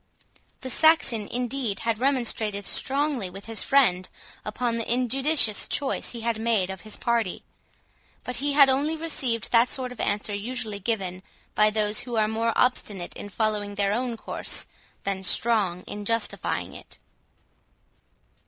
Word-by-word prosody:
The 260 - -4
Saxon, 270 -8 +4
indeed, 245 -3 -2
had 230 -1 -1
remonstrated 230 -6 0
strongly 275 -7 0
with 195 +2 -10
his 225 -1 -1
friend 185 -10 +3 0.3
upon 230 +2 -2
the 230 0 -3
injudicious 255 -1 +2
choice 280 -2 0
he 235 - -6
had 230 -1 -1
made 220 -5 +1
of 190 - -8
his 215 -1 -5
party; 230 -6 -1 0.8
but 250 - -2
he 285 +2 0
had 280 -1 +7
only 280 +4 +1
received 265 -9 -2
that 235 +1 +5
sort 255 -2 -3
of 250 - -11
answer 205 +1 -1
usually 220 0 -4
given 190 -4 -2 0.3
by 215 0 +4
those 210 0 0
who 245 -2 -5
are 215 -1 +3
more 225 +1 0
obstinate 205 -7 0
in 205 - -7
following 210 -1 -1
their 200 0 +1
own 240 0 -2
course, - - 0 0.4
than 195 -1 -2
strong 190 -3 +2
in 205 0 -7
justifying 230 +2 -1
it. - - -12
230 Hz, 150 wpm, -26 LUFS, 205-250 Hz, 0.8 s, had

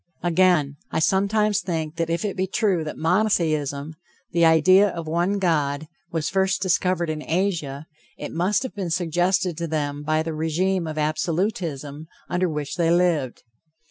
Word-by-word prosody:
Again: 175 -5 +2
I - - -3
sometimes 200 +4 +2
think 160 -3 -3
that 165 -1 -1
if 170 +5 -1
it 200 - -2
be 190 0 -1
true 195 -5 +1
that 150 - -6
monotheism, 160 -6 0 0.4
the 170 - +2
idea 185 +5 +6
of 170 -2 -6
one 175 +5 0
God, 155 -5 0 0.2
was 160 -2 -1
first 190 +3 +1
discovered 180 -2 +1
in 155 -1 -4
Asia, 160 -5 -2 0.3
it - - -6
must 190 +9 +1
have 260 - -5
been 190 -4 -4
suggested 175 +1 0
to 170 - -2
them 145 -2 -2
by 155 +1 0
the 165 0 -4
regime 165 +3 0
of 155 -1 -5
Absolutism, 155 -2 -2 0.2
under 180 0 0
which 150 -2 -4
they 170 -2 +2
lived. 170 -7 +1
170 Hz, 160 wpm, -23 LUFS, 155-185 Hz, 0.4 s, idea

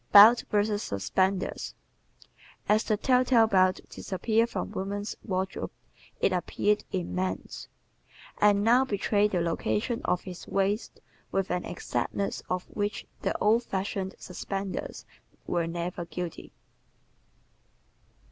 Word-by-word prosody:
Belts 215 +4 +10
vs. 210 0 +1
Suspenders 185 - -1 0.4
¶ - - -24 0.3
As 215 +1 +4
the 215 - +1
tell 250 +3 +3
tale 245 -3 +5
belt 185 -3 +3
disappeared 225 +4 0
from - - -4
woman's 200 +2 -3
wardrobe 190 -2 -2 0.5
it 190 - +2
appeared 205 +3 +1
in 180 -3 -2
man's, 185 0 -3 0.7
and 205 -1 +5
now 240 +4 +5
betrays 205 -3 +1
the 185 - 0
location 165 - -1
of 180 - +1
his 180 -2 -9
waist 200 +3 -1 0.3
with 195 -2 0
an 180 0 -1
exactness 200 - -2
of 180 0 -1
which 205 -1 -3 0.2
the - - 0
old 220 +3 +4
fashioned 190 -3 -3
suspenders 195 +1 -5 0.4
were 170 -1 0
never 170 +1 -3
guilty. 170 0 -6
195 Hz, 120 wpm, -28 LUFS, 185-210 Hz, 0.7 s, Belts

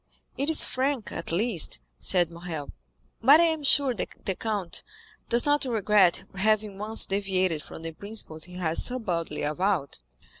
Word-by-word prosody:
"It 280 +3 -1
is 320 - +8
frank, 260 -3 -2
at - - -5
least," 185 - 0 0.2
said 175 -3 +3
Morrel. 165 -4 -7 0.5
"But 280 +7 +7
I - - +6
am 320 -2 +1
sure 275 -2 +3
that 230 - -7
the 190 - 0
count 205 -5 -3 0.5
does 235 0 +4
not 290 0 +2
regret 210 -6 +2
having 210 0 0
once 215 +2 +2
deviated 190 -5 -1
from 160 - -11
the 165 - -5
principles 165 -4 -4
he 180 - -13
has 170 -3 0
so 255 - -1
boldly 170 -9 -3
avowed." 155 - -1
200 Hz, 160 wpm, -26 LUFS, 170-235 Hz, 0.5 s, is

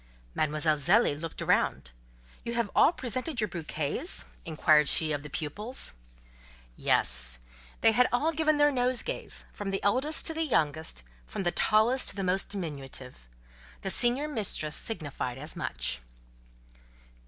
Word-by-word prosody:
Mademoiselle 155 0 0
Zélie 170 -2 +3
looked 165 -1 -6
round. 65 - 0 0.5
"You 235 - -4
have 235 -3 -1
all - - +6
presented 255 0 -4
your 215 - +1
bouquets?" 165 - -3 0.2
inquired 155 -2 +3
she 155 -1 0
of 145 -1 -2
the 150 - -10
pupils. 205 - -1 0.8
Yes; - - +6 0.4
they 225 - +6
had 250 +3 +3
all 290 +7 +1
given 310 -1 +1
their 290 0 +4
nosegays, 255 - -1
from 205 -1 -5
the 195 0 -3
eldest 265 +10 +1
to 320 - 0
the 320 - -3
youngest, 155 - -1 0.2
from 195 - -5
the 175 - +1
tallest 220 +8 +2
to - - -5
the 195 - -3
most 185 +1 0
diminutive. 135 - -7 0.5
The 195 - -2
senior 245 +8 +1
mistress 205 - -2
signified 145 - -4
as 150 +4 -5
much. - - -3
195 Hz, 140 wpm, -28 LUFS, 150-250 Hz, 0.8 s, all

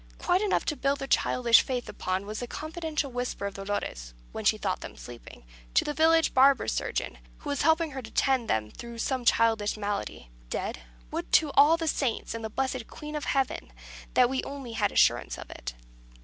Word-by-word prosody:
Quite 365 +2 +1
enough 420 -2 +1
to 300 - -1
build 275 0 0
their 270 - -5
childish 240 -3 +4
faith 250 -2 -3
upon 185 +1 -3
was 215 +2 -5
a 245 - -4
confidential 310 -1 -3
whisper 245 -4 -3
of 200 - -3
Dolores 130 - -4 0.2
when - - -5
she - - +4
thought - - -2
them - - -9
sleeping 120 - -11 0.3
to - - +4
the 295 - -1
village 325 +1 +4
barber 270 +1 +5
surgeon, - - -2 0.2
who 290 - -5
was 285 - -1
helping 320 +1 +3
her 265 -1 -5
to 220 - -10
tend 260 -3 +1
them 105 -1 0
through 235 -1 -9
some 255 +1 -2
childish 225 -3 +3
malady: 200 - -4 0.2
"Dead? 60 - -3 0.3
Would - - -4
to 310 -3 +5
all 295 +4 +6
the 330 -1 -3
Saints, 265 -7 -1
and 230 0 -5
the 220 - -3
blessed 260 0 -2
Queen 300 0 -8
of 300 - -3
Heaven, 270 -2 -1 0.4
that 250 - +6
we 260 +1 -2
only 275 -4 -7
had 225 - 0
assurance - - +3
of - - -9
it!" - - -7
255 Hz, 200 wpm, -28 LUFS, 215-290 Hz, 0.4 s, all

